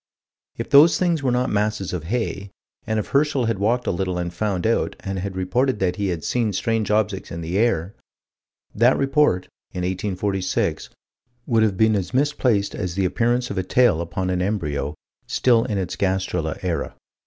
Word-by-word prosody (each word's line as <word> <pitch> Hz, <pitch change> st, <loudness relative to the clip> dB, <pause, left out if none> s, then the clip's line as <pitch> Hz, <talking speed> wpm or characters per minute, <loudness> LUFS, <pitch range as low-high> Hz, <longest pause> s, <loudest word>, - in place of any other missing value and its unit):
If -, -, -5 dB
those 150 Hz, +4 st, +7 dB
things 170 Hz, -4 st, +1 dB
were 135 Hz, -, 0 dB
not 125 Hz, +1 st, 0 dB
masses 105 Hz, -2 st, -1 dB
of 85 Hz, -3 st, -4 dB
hay, 100 Hz, -1 st, -2 dB, 0.4 s
and 110 Hz, -, 0 dB
if 105 Hz, -, -3 dB
Herschel 140 Hz, -3 st, +2 dB
had 115 Hz, -3 st, -1 dB
walked 120 Hz, +5 st, +1 dB
a -, -, +1 dB
little 90 Hz, 0 st, -2 dB
and 85 Hz, -1 st, -3 dB
found 95 Hz, -1 st, -2 dB
out, 115 Hz, -, +1 dB
and 95 Hz, -1 st, -4 dB
had 95 Hz, 0 st, -4 dB
reported 105 Hz, +8 st, 0 dB
that 95 Hz, -1 st, -1 dB
he 100 Hz, -1 st, -1 dB
had 85 Hz, -4 st, -3 dB
seen 115 Hz, -4 st, 0 dB
strange 115 Hz, +1 st, -1 dB
objects 105 Hz, -2 st, 0 dB
in 85 Hz, -, -5 dB
the 85 Hz, +4 st, -2 dB
air 105 Hz, -5 st, +1 dB, 0.8 s
that 120 Hz, +4 st, +4 dB
report, 135 Hz, -9 st, +2 dB, 0.3 s
in 90 Hz, -, -3 dB
1846, 95 Hz, +1 st, -1 dB, 0.6 s
would 115 Hz, -2 st, +2 dB
have 105 Hz, -4 st, +2 dB
been 110 Hz, +1 st, +4 dB
as 95 Hz, +2 st, -3 dB
misplaced 130 Hz, -7 st, +1 dB
as 90 Hz, -1 st, -4 dB
the 95 Hz, -1 st, +1 dB
appearance 120 Hz, +6 st, 0 dB
of 100 Hz, -, -2 dB
a -, -, -1 dB
tail 95 Hz, -3 st, +3 dB
upon 90 Hz, +2 st, -3 dB
an 90 Hz, 0 st, 0 dB
embryo 75 Hz, -7 st, -2 dB, 0.3 s
still 120 Hz, -3 st, +3 dB
in 105 Hz, -, -2 dB
its 95 Hz, -4 st, -3 dB
gastrula 95 Hz, -5 st, -1 dB
era. 85 Hz, -5 st, -2 dB
100 Hz, 185 wpm, -22 LUFS, 90-115 Hz, 0.8 s, those